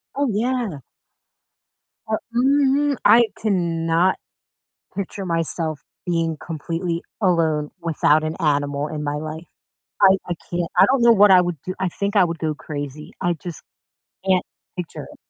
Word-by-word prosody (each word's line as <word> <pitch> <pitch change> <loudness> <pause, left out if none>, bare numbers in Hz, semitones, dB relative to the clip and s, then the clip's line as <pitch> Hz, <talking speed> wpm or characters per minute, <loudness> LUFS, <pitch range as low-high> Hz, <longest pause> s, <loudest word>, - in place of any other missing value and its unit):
Oh, 285 0 +1
yeah. 225 - -1 1.3
Uh, 220 0 0 0.2
mhm, 280 +2 +3
I 235 +1 +8 0.2
cannot 170 -3 +1 0.8
picture 195 0 -4
myself 165 -2 -1 0.3
being 165 -2 0
completely 165 +1 -3 0.2
alone 160 -5 +1
without 155 -2 +2
an 155 +1 -3
animal 145 -1 0
in 150 -1 -5
my 145 0 -2
life. 155 +2 -6 0.6
I 195 -1 +7
I 175 - -1 0.2
can't. 175 -1 -2
I - - +7
don't 260 -1 +2
know 235 0 +7
what 205 -1 +6
I 185 -1 +8
would 175 -2 -1
do. 185 - -4
I 190 - +1
think 200 +4 -3
I 195 - +6
would 170 -1 -3
go 155 -1 -1
crazy. 145 0 -7
I 175 -2 +1
just 165 +1 -8 0.6
can't 185 -1 +3 0.3
picture 180 -2 -6
it. - - -15
175 Hz, 150 wpm, -22 LUFS, 155-200 Hz, 1.3 s, I